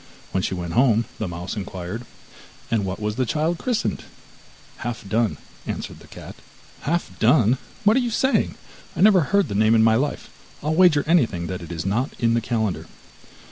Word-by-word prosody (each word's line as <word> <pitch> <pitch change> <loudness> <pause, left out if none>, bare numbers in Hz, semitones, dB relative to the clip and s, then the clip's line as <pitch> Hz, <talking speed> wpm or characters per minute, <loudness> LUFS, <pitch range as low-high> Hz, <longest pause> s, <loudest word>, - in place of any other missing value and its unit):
When 95 - 0
she 95 - -2
went 85 -2 -5
home 120 -2 +4
the 110 - -2
mouse 90 +3 -5
inquired: 95 +3 -6 0.6
'And 110 -4 +1
what 95 0 -4
was 105 0 -3
the 130 - +1
child 160 +5 0
christened?' 245 -4 -1 0.7
'Half 120 -4 -5
done,' 110 +1 +1 0.3
answered - - -5
the - - -16
cat. - - -10 0.5
'Half 170 +4 -2
done! 120 0 +4 0.2
What 210 +2 +5
are - - +4
you 245 -2 0
saying? 260 +4 +1 0.4
I - - -2
never 200 -2 +7
heard 200 -1 +3
the 105 - -5
name 110 +2 +4
in 110 - +5
my 110 0 +5
life, 135 +6 -1 0.3
I'll 155 +1 0
wager 160 -4 +5
anything 115 - +2
it 90 -2 -6
is 80 -1 -4
not 115 +8 0
in 115 -2 +2
the 115 - +2
calendar! 110 -4 -2
115 Hz, 180 wpm, -23 LUFS, 100-155 Hz, 0.7 s, never